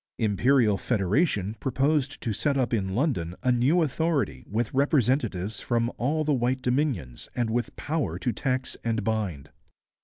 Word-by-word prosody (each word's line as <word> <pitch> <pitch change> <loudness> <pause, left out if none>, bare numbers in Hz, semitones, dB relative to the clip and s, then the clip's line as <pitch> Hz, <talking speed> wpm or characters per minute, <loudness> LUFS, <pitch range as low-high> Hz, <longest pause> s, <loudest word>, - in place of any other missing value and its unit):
Imperial 110 0 +3
Federation 105 - +1
proposed 140 +2 0
to 115 - -1
set 140 +7 0
up 125 -2 0
in 95 -4 0
London 110 - 0
a 130 - +3
new 135 +8 +3
authority 160 0 -1
with 110 +2 -1
representatives 125 - +1
from 120 0 0
all 150 +6 +1
the 150 -1 +1
white 130 0 0
Dominions 125 - -1
and 120 -2 0
with 120 +1 -2
power 155 0 -2
to 125 - -1
tax 130 -1 -2
and 115 -2 -1
bind. 95 -10 -2
120 Hz, 150 wpm, -26 LUFS, 105-140 Hz, -, Imperial